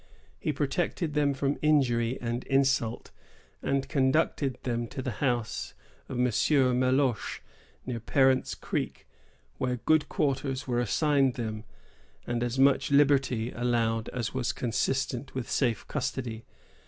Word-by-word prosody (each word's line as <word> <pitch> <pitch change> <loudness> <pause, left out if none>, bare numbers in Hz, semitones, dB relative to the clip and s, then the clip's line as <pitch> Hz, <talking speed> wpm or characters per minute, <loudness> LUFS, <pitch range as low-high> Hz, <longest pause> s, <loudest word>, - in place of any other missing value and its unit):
He - - -1
protected 165 -5 -1
them 145 -2 +2
from 140 +1 -1
injury 130 -5 +2
and 120 +1 -3
insult, 135 -4 +1 0.5
and 135 -1 0
conducted 135 -2 +1
them 120 -1 -1
to 130 - -8
the 130 -1 -2
house 120 -5 -1 0.3
of 130 - -4
M. 125 - +2
Meloche, 130 0 +2 0.4
near 125 -2 -3
Parent's 130 +3 +2
Creek, - - -4 0.5
where 125 -1 0
good 155 +5 +2
quarters 135 -2 -1
were 120 -1 0
assigned 135 +2 +2
them, 110 -2 -4 0.6
and 120 0 -2
as 120 +1 -1
much 135 +1 +4
liberty 135 -5 +3
allowed 115 -2 0
as 120 -3 -3
was 130 -2 -1
consistent 130 +2 -1
with 130 -3 -3
safe 120 -5 0
custody. 120 -5 -3
130 Hz, 130 wpm, -28 LUFS, 120-140 Hz, 0.6 s, much